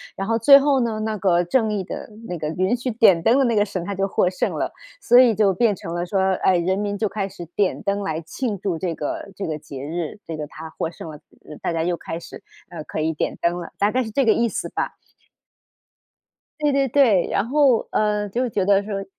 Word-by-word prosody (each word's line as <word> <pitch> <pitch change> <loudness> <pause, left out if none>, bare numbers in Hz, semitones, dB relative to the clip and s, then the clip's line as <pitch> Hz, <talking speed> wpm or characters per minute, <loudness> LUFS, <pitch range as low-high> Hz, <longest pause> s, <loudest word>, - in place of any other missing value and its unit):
然 195 +1 -4
后 230 0 +1
最 275 +5 +9
后 280 -1 +3
呢， 230 -3 -1
那 220 0 -2
个 180 -2 +2
正 220 +4 +1
义 200 -3 -1
的 185 - -7 0.2
那 175 - -4
个 155 - -3
允 185 +7 0
许 250 +1 -3
点 220 -7 +4
灯 235 +7 +4
的 275 - +4
那 235 -2 +1
个 205 - +4
神， 185 -4 -5
他 200 - -3
就 195 +1 -1
获 185 - +1
胜 180 - -1
了， - - -2 0.3
所 245 - +6
以 245 -4 +5
就 200 -2 +3
变 215 +2 +2
成 170 -1 -7
了 175 0 -2
说， 195 +1 0 0.2
哎， 185 - +4
人 185 +3 0
民 205 0 -2
就 215 - 0
开 200 -2 -3
始 175 -2 -9
点 200 -3 0
灯 200 +1 -1
来 160 -5 -2
庆 210 +6 -4
祝 190 -5 -2
这 175 -2 -2
个 155 +7 -5
这 200 - -4
个 155 -1 -3
节 140 -3 -9
日， 165 +3 -4
这 160 -1 -6
个 150 - -5
他 160 +2 -10
获 160 - -3
胜 165 -1 -9
了， 150 - -11 0.4
大 - - -1
家 165 -1 0
又 175 0 0
开 165 0 -6
始， - - -11 0.3
呃， 165 -3 -7
可 - - -5
以 160 +1 0
点 150 - -3
灯 175 +1 +1
了， 170 - -7
大 205 +1 +2
概 255 +2 +1
是 220 - -6
这 270 +4 +1
个 220 - +5
意 235 -1 +1
思 - - -4
吧。 - - -3 1.7
对 295 -1 +2
对 275 -1 +2
对， 235 -8 +3
然 200 - 0
后， 270 -3 +3
呃， 210 -1 0
就 245 +5 -1
觉 200 - 0
得 200 0 +4
说 200 -1 -4
200 Hz, 265 characters per minute, -22 LUFS, 175-225 Hz, 1.7 s, 最